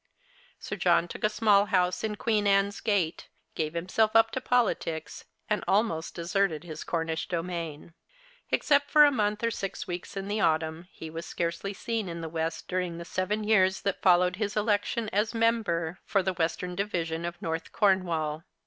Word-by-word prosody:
Sir - - -6
John 170 - +3
took - - -9
a 210 - +4
small 210 -2 +4
house 180 -1 +1
in 215 -1 -1
Queen 210 -1 +1
Anne's 200 0 +2
Gate, 200 -7 0 0.3
gave 155 0 -3
himself 215 +6 +1
up 225 0 +6
to 260 - -3
politics, 220 -11 -1 0.2
and 210 - 0
almost 190 -5 +1
deserted 170 -1 0
his 160 -3 -7
Cornish 165 -1 -2
domain. 170 -3 -4 0.6
Except 285 -1 +2
for 300 -1 +8
a 290 - +4
month 210 -3 0
or 230 - +2
six 195 -3 -4
weeks 175 +2 -6
in 195 0 -4
the 210 +1 -1
autumn, 160 0 0
he 160 -1 -9
was 165 +1 -6
scarcely 170 +3 -2
seen 225 -3 -3
in 170 0 -5
the 165 - -5
West 160 0 -3
during 180 -2 -2
the 170 - -7
seven 200 +5 -1
years 190 -3 +3
that 200 - -2
followed 180 0 +4
his 210 -1 -2
election 210 +2 0
as 210 +3 +1
Member 200 -7 +1
for 195 -2 +2
the 190 0 0
Western 175 +1 -2
Division 170 -4 -2
of 175 0 -5
North 165 0 -4
Cornwall. 170 -6 +1
185 Hz, 175 wpm, -28 LUFS, 165-210 Hz, 0.6 s, for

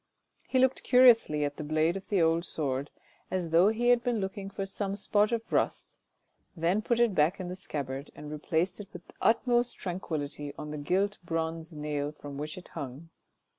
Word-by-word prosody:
He 260 - 0
looked 260 0 +3
curiously 230 - +5
at 145 0 -4
the - - -4
blade 155 +3 +1
of 195 - -7
the 195 -5 +3
old 165 +1 +2
sword 140 -4 -2 0.4
as 180 -3 -2
though 170 +4 +6
he 230 +3 +2
had 245 -1 +5
been 240 -3 0
looking 195 0 -4
for 195 0 -4
some 195 0 -3
spot 205 +1 +2
of 230 -1 -2
rust, - - -1 0.6
then 175 +6 +2
put 235 +2 0
it 235 -3 +4
back 155 +3 +2
in 180 -1 -4
the 180 - -4
scabbard 140 -6 -5
and 150 0 -8
replaced 160 +5 -1
it 205 - -7
with 175 - -10
the - - -15
utmost 240 +1 +2
tranquillity 150 -5 -4
on 150 - -6
the 150 - -4
gilt 195 +7 0
bronze 165 0 -3
nail 150 -1 -2
from 145 -2 -9
which 150 +3 -5
it 185 - -11
hung. 145 +1 -7
170 Hz, 195 wpm, -29 LUFS, 150-205 Hz, 0.6 s, though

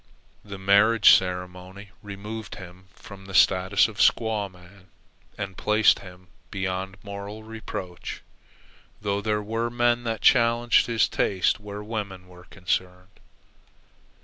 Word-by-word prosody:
The 100 -1 -8
marriage 100 +3 +5
ceremony 90 +2 -5
removed 105 +2 -8
him 90 +1 -12
from 95 -1 -13
the 95 - -8
status 95 +3 +4
of 110 -2 -11
squaw 110 -3 +2
man 90 +1 -18 0.5
and 95 -2 -5
placed 105 +3 +3
him 90 -1 -14 0.2
beyond 95 0 -4
moral 100 +2 -8
reproach, 110 -5 -7 0.8
though 100 -1 -2
there 105 0 -1
were 115 +3 -2
men 120 0 +1
that 115 -2 -3
challenged 115 0 +4
his 115 -2 +2
taste 95 0 0
where 105 0 -8
women 100 -4 -6
were 90 -1 -16
concerned. 90 0 -4
100 Hz, 120 wpm, -25 LUFS, 95-110 Hz, 0.8 s, marriage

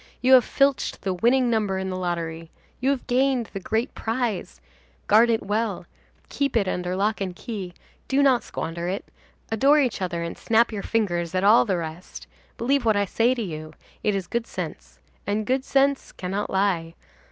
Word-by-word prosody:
You 255 +1 +4
have 255 -2 +8
filched 275 -1 +1
the 190 -1 0
winning 240 +6 +2
number 210 -4 0
in 190 0 -3
the - - -3
lottery; 165 -2 -3 0.3
you 260 - +1
have 275 -3 -1
gained 255 -2 +1
the 195 - -3
great 220 +6 -1
prize, 225 -4 -3 0.5
guard 225 +3 +5
it 225 -1 +1
well, 205 -3 -1 0.4
keep 280 -4 0
it 200 -4 +1
under 180 0 -2
lock 205 +2 0
and 185 -2 -3
key, 190 -5 -6 0.3
do 275 +1 +2
not 260 -3 +4
squander 170 +1 -4
it, 190 +3 -3 0.5
adore 275 +7 +4
each 255 -8 +1
other 175 -2 -2
and 170 - -5
snap 230 +1 +2
your 210 -2 -4
fingers 175 -7 -1
at 185 - +1
all 210 +4 +6
the 190 -5 0
rest. 165 +1 -7 0.3
Believe 270 +3 +1
what 220 -3 +3
I 200 - +2
say 230 +6 +2
to 235 - -3
you. 155 -4 -6 0.3
It 210 -1 +1
is 195 -2 -2
good 235 +5 -3
sense. - - -7 0.3
And 210 +1 0
good 260 +3 0
sense 275 0 +1
cannot 195 +3 -4
lie. 185 -4 0
210 Hz, 185 wpm, -24 LUFS, 185-245 Hz, 0.5 s, have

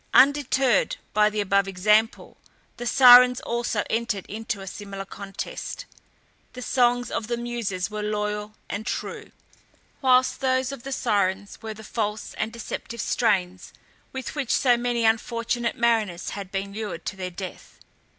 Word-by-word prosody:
Undeterred 270 -4 +4 0.2
by 210 0 +4
the 215 0 -3
above 200 0 +2
example, 210 +4 +1 0.4
the 240 - -4
Sirens 250 0 +8
also 235 -2 -1
entered 225 -4 -1
into 220 0 -4
a 195 - -8
similar 195 0 -7
contest. 200 - -6 0.7
The 250 0 -7
songs 245 -1 +2
of 215 - -2
the 235 0 -1
Muses 230 -6 -3
were 210 0 -4
loyal 210 0 -3
and 205 - -4
true, - - -4 0.7
whilst 255 -1 +4
those 260 0 +1
of 275 -3 -7
the 270 - -7
Sirens 200 -6 -1
were 220 -1 -6
the 220 - -11
false 215 -1 -3
and 220 - -1
deceptive 235 0 -6
strains 190 -6 0 0.4
with 265 -1 -5
which 280 -5 -2
so 250 -2 +4
many 240 -1 0
unfortunate 230 +1 0
mariners 225 -7 +1
had 195 -2 -7
been 195 0 -3
lured 215 0 -5
to 205 - -3
their 185 -1 -4
death. 185 +1 -9
220 Hz, 150 wpm, -25 LUFS, 200-245 Hz, 0.7 s, Sirens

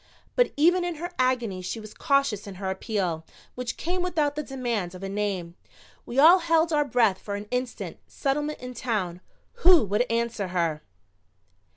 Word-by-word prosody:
But - - +3
even 350 +4 +4
in 350 -1 -2
her 345 +3 -5
agony 240 -7 +1
she 185 +5 -4
was 215 -1 -10
cautious 275 -8 +1
in 195 - -7
her 190 0 -3
appeal, 190 -5 -2 0.3
which 250 -1 -4
came 360 +2 -2
without 320 -5 0
the 300 - -1
demand 240 -10 -3
of 185 - -9
a 195 - -3
name. 195 -4 -2 0.5
We 240 - -5
all 330 +6 +8
held 330 -1 +2
our 295 -1 +4
breath 230 -8 +2
for 200 - -5
an 205 +1 -5
instant, 250 0 -3
Settlement 295 +2 -1
and 250 0 -7
Town. 190 -9 -2 0.4
Who 350 -9 +7
would 210 +5 +1
answer 230 -3 -1
her? 170 -4 -1
240 Hz, 175 wpm, -26 LUFS, 195-295 Hz, 0.5 s, all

